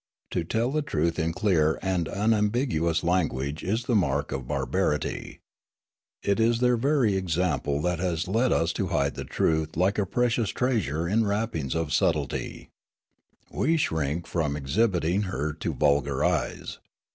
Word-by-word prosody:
To 90 - -1
tell 115 +9 0
the 155 +1 0
truth 85 - -1
in 80 +1 0
clear 80 -4 +2
and 90 -4 0
unambiguous 105 - +1
language 80 -5 0
is 110 +6 -1
the 125 - -1
mark 70 -8 +1
of 65 -2 -4
bar - - -1
barity. 75 0 -2 0.8
It 100 +2 +1
is 115 +1 +3
their 125 0 +3
very 125 -4 +2
example 85 -6 0
that 90 -1 0
has 85 -2 -1
led 115 +6 +2
us 85 0 +1
to - - -2
hide 70 0 0
3? - - -6
Riallaro - - -18
truth 80 -1 0
like 95 +4 +2
a 100 - 0
precious 120 0 +1
treasure 85 - 0
in 110 +4 +2
wrappings 100 - -1
of 80 -3 -1
subtlety. - - -1 0.8
We 165 +4 +1
shrink 80 - -1
from 75 -5 -1
exhibiting 90 +4 +1
her 75 -2 -2
to - - -2
vulgar 70 -1 +1
eyes. - - -2
90 Hz, 155 wpm, -26 LUFS, 80-110 Hz, 0.8 s, is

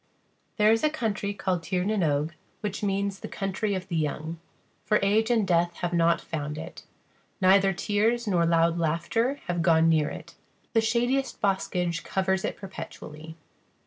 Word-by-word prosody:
[There 210 0 +5
is 225 +4 +2
a 305 - +4
country 220 -9 -2
called 190 -3 -1
Tír 180 +2 -1
na 215 - +1
n 210 - 0
Og, 150 0 +1 0.3
which 205 -2 -3
means 200 -1 -1
the - - -6
Country 195 +1 -2
of 185 0 -5
the 170 - -3
Young, 160 +1 -2 0.4
for 210 - +3
age 215 +3 +3
and 225 -5 +2
death 175 -1 +2
have 175 0 -3
not 170 0 +3
found 150 -1 -5
it; 155 - -9 0.5
neither 195 0 +5
tears 215 +5 0
nor 180 -5 +2
loud 165 0 +3
laughter 170 - 0
have 175 -1 -1
gone 165 -1 +4
near 155 -2 +3
it. 170 +1 -9 0.4
The 225 - +4
shadiest 245 +4 0
boskage 180 -4 0
covers 190 0 0
it - - -3
perpetually. 160 -4 -9
190 Hz, 170 wpm, -27 LUFS, 165-210 Hz, 0.5 s, There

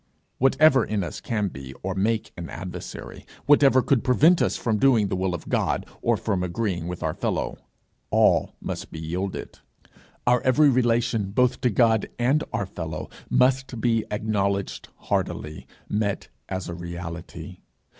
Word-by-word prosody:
Whatever 135 0 +5
in 105 -3 -1
us 85 - -6
can 105 -4 -1
be 65 -4 -9
or 95 +1 -1
make 105 +4 0
an 85 -2 -7
adversary, 90 +1 -7 0.2
whatever 140 -3 +5
could 135 -5 +2
prevent 155 +8 +5
us - - +1
from 110 -3 0
doing 115 -6 +4
the 95 - -1
will 95 -1 -1
of 85 - -9
God, - - 0 0.2
or - - +2
from 95 -2 -1
agreeing 90 -2 -2
with 90 0 -5
our 80 -1 0
fellow - - -2 0.5
all - - +3
must - - -5
be 80 - -7
yielded. 90 +4 -4 0.7
Our 125 0 +4
every 145 +3 +5
relation, 115 -5 +1
both 125 +5 +1
to 125 - +3
God 110 -1 +3
and 135 +6 +2
our 105 -2 -1
fellow, 80 -4 -6 0.2
must 130 -1 +2
be 115 -1 +2
acknowledged 100 -2 -1
heartily, 75 0 -3 0.2
met 105 -1 -1 0.2
as 95 -1 -3
a 85 - -5
reality. 85 -1 -7
105 Hz, 155 wpm, -25 LUFS, 90-125 Hz, 0.7 s, Whatever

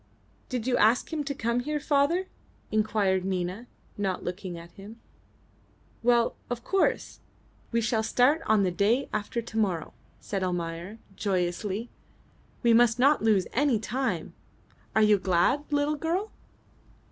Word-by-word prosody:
"Did 250 -4 -3
you 255 -1 +2
ask 230 +9 +3
him 305 -2 -1
to 280 0 -3
come 235 0 0
here, 300 +4 -2
father?" 295 +6 +2 0.5
inquired 210 -3 +1
Nina, 185 +4 -3 0.3
not 190 -2 -1
looking 180 -1 -5
at 170 0 -11
him. 210 +5 -12 1.0
"Well, 235 0 +3
of 240 -1 -4
course. 390 -1 0 0.5
We 230 0 +1
shall 225 0 +1
start 250 +8 +3
on 215 -2 +4
the 185 - +1
day 215 +9 +1
after 215 +3 -2
to 225 -1 -7
morrow," 185 -6 -1 0.3
said 195 -2 -4
Almayer, 175 +2 -3 0.2
joyously. 195 +3 -2 0.7
"We 235 -1 +5
must 235 0 +5
not 280 +4 +4
lose 210 -4 +3
any 275 -2 +2
time. 250 +5 -2 0.6
Are 220 - +5
you 210 -1 +5
glad, 190 +10 +2
little 290 +1 +1
girl?" 350 +8 -2
220 Hz, 140 wpm, -27 LUFS, 195-255 Hz, 1.0 s, We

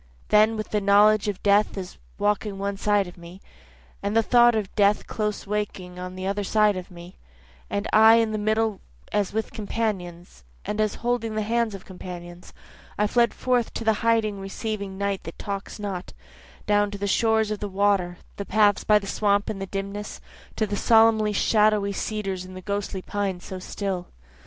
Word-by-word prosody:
Then 215 +1 +4
with 215 - -4
the 210 - +1
knowledge 205 +1 +5
of 205 -2 -3
death 205 +1 +3
as 185 -1 -7 0.2
walking 205 0 0
one 200 0 -2
side 205 0 +1
of 175 0 -12
me, 170 +2 -12 0.6
And 205 +2 0
the 225 - +4
thought 240 0 +5
of 210 -3 -2
death 205 0 +3
close 210 -1 -3
walking 200 -3 -3 0.2
the 185 0 -5
other 200 +1 -1
side 210 0 +3
of 185 -1 -6
me, 175 +1 -12 0.5
And 200 0 -2
I 220 +1 +8
in 225 -1 +2
the 215 - -2
middle 215 -1 0 0.3
as 205 -2 0
with 220 +1 -2
companions, 180 - -4 0.2
and 215 +1 -1
as 215 -1 0
holding 235 -2 0
the 215 - 0
hands 230 -1 0
of 195 - -11
companions, 175 -1 -9 0.5
I 210 - +2
fled 235 +2 +3
forth 250 -2 0
to - - -3
the 220 0 +3
hiding 225 -3 +1
receiving 200 0 -5
night 200 -1 -1
that 165 - -8
talks 200 -1 -5
not, 195 -4 -5 0.5
Down 205 0 +2
to 200 - -6
the 200 - -3
shores 220 +1 +2
of 210 - -3
the 205 - -4
water, 190 -2 +1 0.2
the 200 - -4
path 210 -1 +2
by 210 - +6
the 205 - -4
swamp 200 0 +1
in 200 - -6
the 195 - -4
dimness, 200 +2 -5 0.4
To 220 - +1
the 205 -1 -3
solemn 220 -1 +4
shadowy 210 -1 +2
cedars 195 -3 -3
and 185 0 -10
ghostly 200 -2 -3
pines 195 -3 -3
so 190 - -6
still. 185 -1 -4
205 Hz, 185 wpm, -25 LUFS, 195-215 Hz, 0.6 s, I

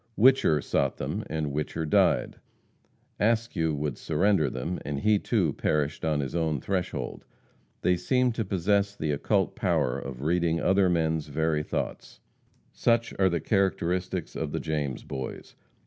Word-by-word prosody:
Whicher 115 - +5
sought - - 0
them - - -3
and 75 -2 -2
Whicher 75 +2 -2
died; - - +2 0.8
Askew 110 -8 +1
would 75 0 -3
surrender 80 -1 +2
them, 90 +7 -4
and 70 -1 -3
he, 105 -1 +3
too, 95 - +1
perished 75 0 -1
on 75 -2 +1
his 70 +3 -4
own 80 -4 0
threshold. 95 +4 -3 0.6
They 90 0 +3
seem 125 +8 +2
to 115 0 -2
possess 100 +1 +1
the 75 -5 -2
occult 70 - 0
power 60 - +1
of 65 0 -7
reading 85 +1 +1
other 95 +1 +3
men's 80 -3 0
very 80 +1 0
thoughts. 75 - -4 0.5
Such 115 0 +1
are 95 -1 +5
the 85 -1 0
characteristics 95 -3 0
of - - -3
the - - -1
James 75 -5 -3
Boys. 65 -1 -6
80 Hz, 145 wpm, -27 LUFS, 75-100 Hz, 0.8 s, Whicher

